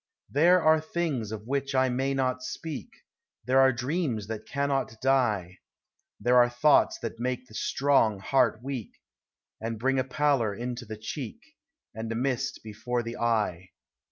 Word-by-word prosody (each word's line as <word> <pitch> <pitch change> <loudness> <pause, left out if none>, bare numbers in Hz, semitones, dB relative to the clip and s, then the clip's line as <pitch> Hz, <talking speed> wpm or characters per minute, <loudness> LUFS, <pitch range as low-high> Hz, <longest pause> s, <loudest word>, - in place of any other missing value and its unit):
There 170 +5 +5
are 155 0 +5
things 155 -9 -2
of 110 -1 -6
which 140 +2 -2
I 130 0 +4
may 135 +2 0
not 130 -1 0
speak; 150 +3 -6 0.6
There 130 +2 +4
are 135 0 +6
dreams 130 - -2
that 110 -1 -5
cannot 140 -5 -1
die; 110 -9 +1 0.6
There 125 +1 +3
are 120 0 +6
thoughts 125 +5 +4
that 115 0 -5
make 125 +1 -2
the 110 - -18
strong 130 -4 +2
heart 120 +2 +1
weak, 130 -5 -5 0.7
And 115 0 -3
bring 135 +4 +1
a - - +2
pallor 130 -5 +1
into 120 +2 -5
the 110 0 -6
cheek, 145 - -7 0.4
And 110 0 -5
a - - -2
mist 125 +1 -1
before 120 +3 -3
the 115 +1 -6
eye. 105 -6 0
125 Hz, 155 wpm, -28 LUFS, 115-135 Hz, 0.7 s, are